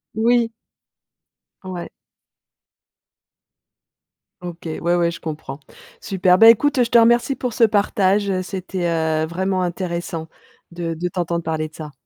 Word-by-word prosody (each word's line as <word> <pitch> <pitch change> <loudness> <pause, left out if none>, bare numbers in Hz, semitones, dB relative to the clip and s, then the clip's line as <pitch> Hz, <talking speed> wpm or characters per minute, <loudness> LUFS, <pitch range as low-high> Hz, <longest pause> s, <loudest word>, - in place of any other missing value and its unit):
Oui. 230 +1 +2 1.1
Ouais. 185 -2 -7 2.5
OK. 175 -2 -9
Ouais, 170 +2 -1
ouais, 170 -1 +1
je - - -9
comprends. 150 -3 -7 0.4
Super, 185 -2 +2
bah, 225 0 +9
écoute, 290 +6 +4
heu, - - +5
je 235 - -3
te 235 - +5
remercie 240 +4 +4
pour 250 -2 -4
ce 235 - +2
partage, 205 -2 +2
heu, 185 -1 0
c'était, 185 -1 -4
heu, 160 -1 0
vraiment 185 +2 -1
intéressant 175 -2 -4 0.4
de 170 -1 -4
de 175 +3 -3
t'entendre 170 -1 -2
parler 160 -1 -2
de 155 - -19
ça. 155 -2 -8
180 Hz, 140 wpm, -20 LUFS, 165-205 Hz, 2.5 s, bah